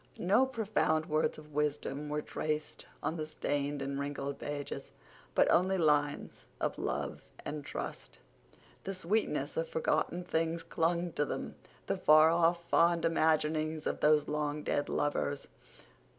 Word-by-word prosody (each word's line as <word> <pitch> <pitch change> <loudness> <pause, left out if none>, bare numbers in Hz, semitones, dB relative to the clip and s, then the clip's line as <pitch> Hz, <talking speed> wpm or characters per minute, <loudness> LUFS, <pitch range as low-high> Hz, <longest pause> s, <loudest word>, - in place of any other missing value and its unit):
No 210 +9 +3
profound 215 -10 +1
words 155 -1 0
of 150 -1 -13
wisdom 150 0 -1
were 150 0 -2
traced 155 0 -3 0.2
on 165 - -1
the 155 - -2
stained 145 -2 -2
and 140 0 -3
wrinkled 140 0 -3
pages, 145 -1 -5 0.4
but - - +5
only 190 +2 +3
lines 145 -3 +1
of - - -1
love - - -2 0.2
and 150 -1 -4
trust. - - -6 0.7
The 195 0 -4
sweetness 205 - -1
of - - -1
forgotten 480 - 0
things 165 -1 -1
clung 170 +1 0
to 145 - 0
them—the - - -5
far 155 +1 +7
off, 170 0 +2
fond 170 0 +3
imaginings 155 -1 +1
of - - -1
those 150 -1 +4
long 150 0 -2
dead 145 - 0
lovers. 145 -1 -1
155 Hz, 135 wpm, -32 LUFS, 145-170 Hz, 0.7 s, far